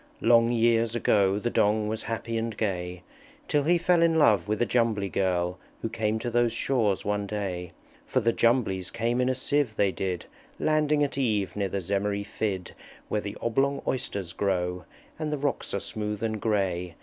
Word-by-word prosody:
Long 115 0 +5
years 115 -1 +2
ago 100 -4 +3
The 120 +3 -2
Dong 105 +1 +2
was 110 +1 -2
happy 115 0 -4
and 115 -1 -2
gay, 90 -4 -2 0.4
Till 150 - +2
he 175 +2 +4
fell 170 0 +3
in 165 -1 +4
love 110 -10 +4
with 105 0 -1
a 120 - +3
Jumbly 115 -5 +1
Girl 90 -1 0 0.2
Who 115 - -1
came 110 -1 -1
to 120 +2 -3
those 120 0 +3
shores 115 -4 0
one 105 0 -1
day. 95 -4 -4 0.4
For - - +1
the 115 +1 +2
Jumblies 110 -7 +1
came 120 +2 0
in 125 - +2
a 130 - +1
sieve, 140 -6 0
they 100 -2 +2
did, 90 -2 -3 0.3
Landing 150 -1 +2
at 140 -1 -2
eve 105 -7 0
near 100 -2 -1
the 100 +1 -2
Zemmery 100 +2 -1
Fidd 100 -3 -3 0.4
Where 105 - 0
the 100 - -6
Oblong 135 +4 +1
Oysters 100 -8 -2
grow, 90 -2 -1 0.3
And 155 -1 -2
the 150 - -1
rocks 140 0 -2
are 100 - -1
smooth 105 +1 -4
and 110 -2 -2
gray. 90 -5 -1
110 Hz, 185 wpm, -27 LUFS, 100-120 Hz, 0.4 s, Long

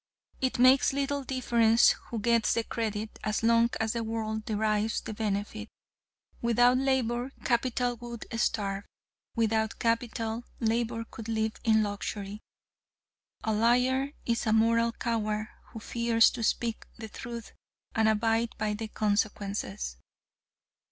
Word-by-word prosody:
It 260 -1 0
makes 255 +2 +5
little 280 0 -1
difference 235 -3 +4 0.2
who 235 - -3
gets 230 +1 +2
the 230 - +1
credit, 220 -1 -4
as 215 +1 -1
long 230 0 +4
as 220 -1 0
the 235 -1 -2
world 220 -1 -3
derives 215 0 0
the 220 - -6
benefit. 215 +1 -3 0.7
Without 245 +2 +4
Labor, 260 -2 0
Capital 245 0 0
would 235 -1 -8
starve; 200 -3 -1 0.5
without 220 -1 +1
Capital, 230 0 -1 0.2
Labor 230 0 0
could 225 0 -8
live 220 -1 0
in 220 -1 +4
luxury. 205 0 -4 1.0
A 220 - 0
liar 250 +5 +2
is 230 0 0
a 215 - +3
moral 230 +1 +3
coward 215 -2 -2 0.2
who 225 - -9
fears 230 0 +3
to 245 - -6
speak 230 0 -1
the 225 - -7
truth 235 +1 -8 0.4
and 220 -1 +3
abide 225 +1 +1
by 215 -1 -1
the 220 +1 -4
consequences. 205 - -2
225 Hz, 130 wpm, -29 LUFS, 215-235 Hz, 1.0 s, makes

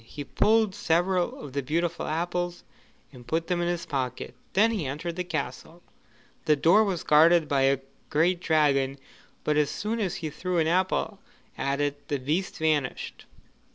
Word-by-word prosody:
He 145 +5 -8
pulled 215 +7 +2
several 175 +1 0
of 140 -3 -9
the 140 - -1
beautiful 170 +5 -1
apples 175 +2 -2 0.5
and 125 -2 -14
put 165 +1 0
them 175 -1 -1
in 175 - 0
his 175 -1 -2
pocket; 130 -3 -3 0.2
then 220 +4 +4
he 195 -11 -2
entered 165 +5 -4
the 180 - -2
castle. 160 +1 -5 0.6
The 155 - +4
door 175 +9 +5
was 190 -5 -2
guarded 160 +1 +5
by 140 -2 +1
a 135 -1 0 0.3
great 170 +4 +2
dragon, 140 -5 +2 0.5
but 150 0 +1
as 150 -1 +3
soon 220 +3 -3
as 195 -5 -1
he 155 -2 -4
threw 180 +3 -3
an 160 - +3
apple 185 +4 0 0.4
at 140 +1 -1
it, 145 0 -2
the 145 - -1
beast 155 +9 -2
vanished. 155 -5 -1
160 Hz, 170 wpm, -27 LUFS, 145-180 Hz, 0.6 s, door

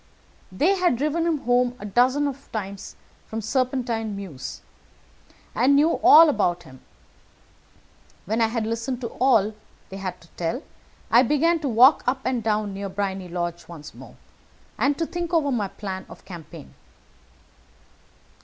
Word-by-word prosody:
They 330 - +2
had 350 -9 +2
driven 305 +5 0
him 325 -2 +1
home 245 +1 +1
a 205 - -9
dozen 255 +6 +2 0.2
times 200 -2 -6 0.3
from 220 - -4
Serpentine 235 -2 -1
Mews, 175 -10 -8 0.9
and 260 +5 +3
knew 305 +4 +4
all 330 -2 +9
about 175 - 0
him. 130 -5 -15 1.4
When 220 +4 -1
I 225 - +4
had 225 -1 -2
listened 230 +3 -3
to 235 - -4
all 230 -5 +2
that - - -21 0.3
they 195 - -8
had 185 -2 -5
to 165 - -18
tell, 175 - -4 0.5
I 235 - +7
began 310 +6 +2
to 290 -3 -2
walk 255 +5 +6
up 260 +1 0
and 255 -2 0
down 210 -2 -1
near 200 0 -5
Briony 190 -1 -3
Lodge 175 0 -4
once 155 -3 -11
more, - - -13 0.6
and 280 0 +1
to 330 - -1
think 345 +1 -3
over 290 -4 +2
my 215 -6 0
plan 190 -1 -7
of - - -14
campaign. 165 -4 -11
230 Hz, 155 wpm, -24 LUFS, 195-275 Hz, 1.4 s, all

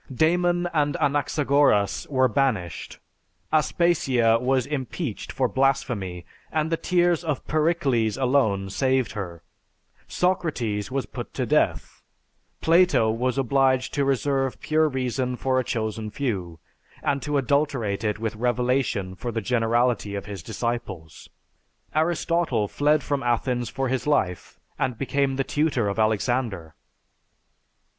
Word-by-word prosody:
"Damon 175 +5 +2
and 145 -3 +1
Anaxagoras 140 -6 +2
were 130 -2 +3
banished; 110 - -1 0.6
Aspasia 135 -8 +3
was 130 0 +1
impeached 140 - -4
for 130 - +1
blasphemy 105 -8 -1 0.3
and 155 0 0
the - - +3
tears 175 -1 +1
of 150 -5 -3
Pericles 145 -9 +1
alone 125 -8 +1
saved 130 +2 +1
her; 85 -5 -6 0.6
Socrates 125 - -1
was 135 -2 -2
put - - -8
to - - -1
death; - - 0 0.6
Plato 165 -9 +4
was 125 +3 -1
obliged 130 0 +2
to 140 - +1
reserve 135 -1 0
pure 155 0 +2
reason 125 -1 -2
for 130 +1 0
a - - 0
chosen 110 -2 -3
few, 100 -10 -3 0.5
and 140 -1 0
to 150 -1 -1
adulterate 135 -6 0
it 105 -1 0
with 110 0 -3
revelation 120 -4 0
for 120 +6 -5
the 115 - -2
generality 115 -1 +1
of 100 - -5
his 100 -3 -7
disciples; 95 -6 -5 0.6
Aristotle 160 -7 +1
fled 150 +6 +2
from 140 -1 -1
Athens 120 0 0
for 135 0 -2
his 130 +1 -2
life, 95 -12 -1 0.2
and 125 -3 -1
became 135 +1 0
the 135 - 0
tutor 145 -7 0
of 100 +2 -2
Alexander." 110 -6 0
130 Hz, 125 wpm, -24 LUFS, 110-145 Hz, 0.6 s, Plato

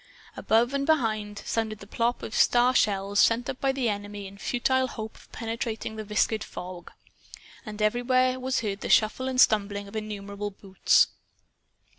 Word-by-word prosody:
Above 235 +4 +2
and 275 0 -1
behind, 215 -9 0
sounded 220 -1 -2
the 200 - -12
plop 230 +4 -1
of 220 - -6
star 245 +3 +4
shells 200 -3 +1
sent 235 +2 +3
up 260 - -5
by 270 - +2
the 265 -3 -1
enemy 205 -1 -4
in 195 +1 -10
futile 260 +4 0
hope 220 -3 -7
of - - -19
penetrating 225 -1 -4
the 215 - -5
viscid 215 +1 0
fog. 180 -1 -9 0.8
And 210 0 -7
everywhere 255 +3 +2
was 260 0 -1
heard 205 -3 -3
the - - -4
shuffle 220 +4 +3
and 260 -1 -1
stumbling 205 -3 +3
of 200 - -12
innumerable 205 -1 -5
boots. 195 -1 +2
220 Hz, 165 wpm, -27 LUFS, 205-245 Hz, 0.8 s, star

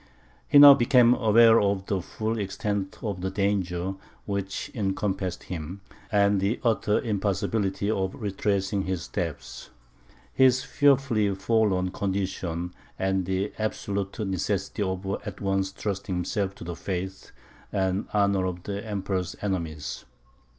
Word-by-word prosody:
He - - +5
now 145 0 +12
became 125 -2 +5
aware 115 -1 +6
of 100 -1 0
the 100 -2 -1
full 110 +5 -3
extent 100 0 -3
of 100 -5 -3
the 95 - -1
danger 95 -2 -1 0.3
which 100 -1 -3
encompassed 95 -3 -2
him, 90 +3 -6 0.3
the 100 +1 +2
utter 110 -3 +2
impossibility 100 -2 -1
of 95 -3 -1
retracing 100 -1 -1
his 95 -2 -2
steps, 85 -5 -5 0.6
his 130 -1 +4
fearfully 135 -8 +2
forlorn 100 -3 +1
condition, 95 -3 -3 0.2
and 95 -1 0
the 95 +2 -1
absolute 100 -2 -3
necessity 95 0 -2
of 95 -1 -2 0.2
at 100 -2 -7
once 95 -1 0
trusting 100 -1 -3
himself 95 +2 -2
to - - -10
the 85 0 -5
faith 95 +1 -5 0.4
and 95 +1 0
honour 100 -2 +2
of 90 -1 -5
the 100 0 -4
Emperor's 95 -4 -3
enemies. 80 -10 -3
100 Hz, 125 wpm, -26 LUFS, 95-105 Hz, 0.6 s, now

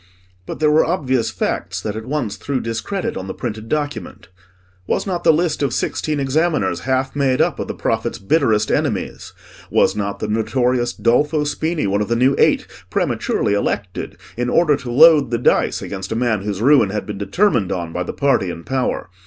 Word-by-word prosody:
But - - -6
there 155 -1 +3
were 155 - +5
obvious 130 -9 0
facts 90 +2 -3
that 105 +2 -4
at 110 +2 -6
once 130 -7 -2
threw 140 -2 -3
discredit 115 - -3
on 95 - -5
the - - -5
printed 110 -2 -5
document. 145 - -4 0.6
Was - - 0
not 180 -3 -3
the 165 - +6
list 160 0 0
of 135 -4 0
sixteen 150 -2 -1
examiners 135 - 0
half 130 +1 0
made 135 -3 +1
up - - +1
of - - -3
the - - -5
prophet's - - -1
bitterest 110 -2 +1
enemies? - - -2 0.4
Was - - +3
not 100 -1 -3
the 110 - -4
notorious 120 +3 0
Dolfo 150 +7 +1
Spini 155 +1 -1
one 100 +1 +1
of 105 - -1
the 115 - 0
new 130 +3 +3
Eight - - +3 0.2
prematurely 100 - 0
elected, 100 -2 -3 0.2
in 120 +1 -1
order 155 -1 +3
to 125 -3 -6
load 150 0 +6
the 120 - 0
dice 120 - +1
against 95 -1 -6
a - - -1
man 115 -3 0
whose 100 +1 -3
ruin 130 -6 +5
had 105 +2 -3
been 105 -2 -6
determined 105 - +1
on 85 -3 -3
by 90 - -2
the 90 - -3
party 135 -10 +1
in 85 -1 -7
power? 130 -4 -2
120 Hz, 195 wpm, -19 LUFS, 105-145 Hz, 0.6 s, the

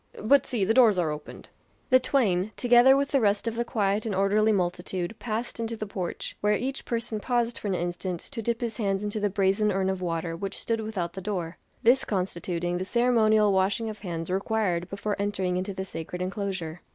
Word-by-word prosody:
But 275 +6 +4
see, 230 -7 0
the 220 - +2
doors 230 -5 +6
are 165 -4 +1
opened." 150 0 -9 0.4
The 255 - +7
twain, 215 -7 +1
together 245 +2 +6
with 280 0 0
the 275 -3 +2
rest 205 +1 +1
of 230 - 0
the 235 - 0
quiet 205 -2 0
and 215 -4 -2
orderly 205 +3 +3
multitude, 180 -1 -1
passed 230 +1 -4
into 230 0 -3
the 215 - -4
porch, 190 -3 -4
where 210 0 +3
each 265 +5 -3
person 230 -2 -2
paused 240 +1 0
for - - -5
an 195 - 0
instant 175 0 -3
to 255 -5 -5
dip 235 +2 -1
his 230 -3 -3
hands 195 -2 0
into 210 +1 -2
the 205 0 +1
brazen 200 +2 +2
urn 190 0 +1
of 190 -1 -4
water 165 -1 -2
which 195 +3 -5
stood 230 -1 -1
without 190 -6 -3
the 190 - -6
door; 180 -4 -4 0.2
this 250 +3 +5
constituting 175 -2 -2
the - - -1
ceremonial 220 -2 +3
washing 195 +4 +1
of 210 - -11
hands 170 -3 -4
required 190 -3 0
before 200 +1 -2
entering 190 -3 -1
into 185 +2 -2
the 190 0 -5
sacred 180 -1 -6
enclosure. 185 -3 -3
200 Hz, 205 wpm, -27 LUFS, 185-225 Hz, 0.4 s, The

